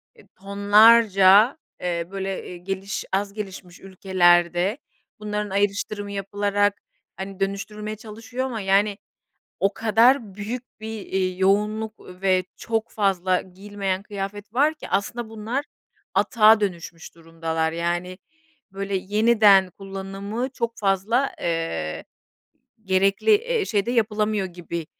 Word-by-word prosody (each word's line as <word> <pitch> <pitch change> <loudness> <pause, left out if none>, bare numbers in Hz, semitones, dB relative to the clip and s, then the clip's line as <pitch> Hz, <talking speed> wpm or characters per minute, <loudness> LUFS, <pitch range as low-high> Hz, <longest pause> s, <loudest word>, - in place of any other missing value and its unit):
e, 440 - -20
tonlarca, 205 +2 +5 0.2
eee, 170 -1 -2
böyle, 195 -1 -4
eee, 180 - -8
geliş 195 +2 -4
az 200 +1 -1
gelişmiş 190 -4 -8
ülkelerde 180 +1 +2 0.4
bunların 210 -1 -3
ayrıştırımı 205 +1 -1
yapılarak, 205 +1 0 0.4
hani, 195 0 -7
dönüştürülmeye 210 +2 -3
çalışıyor 225 +4 -6
ama 230 -5 -4
yani, 195 +1 +2 0.6
o 195 - +2
kadar 225 0 +3
büyük 225 +5 -5 0.2
bir, 220 0 -6
eee, 185 -1 -1
yoğunluk 210 +3 0 0.2
ve 185 -1 +2
çok 225 -1 -2
fazla 190 -3 +1
giyilmeyen 195 0 -4
kıyafet 205 +1 -7
var 295 +5 +3
ki - - -10
aslında 220 +4 -2
bunlar 225 +6 -3 0.5
atığa 220 -2 +5
dönüşmüş 170 -4 -5
durumdalar. 165 -1 -3
Yani, 175 +2 -2 0.5
böyle 195 0 -3
yeniden 205 -1 +4
kullanımı 195 +5 -5
çok 235 -3 -4
fazla, 210 +7 +1
eee, 165 - -2 0.8
gerekli, 195 - +2
eee, 465 0 0
şeyde 210 - 0
yapılamıyor 215 -3 0
gibi 170 -2 -6
200 Hz, 115 wpm, -23 LUFS, 190-215 Hz, 0.8 s, tonlarca